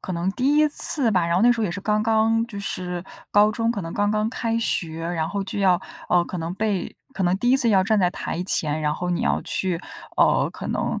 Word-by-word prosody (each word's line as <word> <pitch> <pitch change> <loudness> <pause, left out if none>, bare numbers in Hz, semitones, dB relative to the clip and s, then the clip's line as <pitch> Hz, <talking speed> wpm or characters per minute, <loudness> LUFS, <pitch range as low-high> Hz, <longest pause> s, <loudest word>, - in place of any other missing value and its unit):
可 185 - -6
能 175 +2 -1
第 275 +6 +1
1 305 0 +4
次 280 -4 +3
吧， 180 -4 +1
然 170 - 0
后 185 - +2
那 240 - +6
时 240 - +1
候 - - +1
也 185 - -1
是 200 - -5
刚 210 +1 0
刚 225 +1 +2
就 205 -4 -8
是 180 -2 -4 0.3
高 205 +1 +5
中 230 +1 -1
可 205 - -4
能 165 -2 -6
刚 205 0 0
刚 215 0 0
开 230 -2 -2
学， 165 -7 -1
然 165 -1 -2
后 200 +2 -3
就 195 +1 -5
要， 185 -3 +3 0.3
呃， 175 -1 +3
可 180 - -6
能 165 +2 -4
被 205 -1 -2 0.2
可 195 - -3
能 180 +2 +2
第 245 +4 +1
1 265 - +5
次 260 -3 +2
要 195 -4 +4
站 215 +2 +1
在 180 -2 +2
台 180 -2 -4
前， 155 -4 0
然 150 0 0
后 180 +2 -3
你 175 - -1
要 - - 0
去， 180 -3 -2 0.4
呃， - - +3
可 - - -7
能， - - -2
195 Hz, 265 characters per minute, -23 LUFS, 175-225 Hz, 0.4 s, 那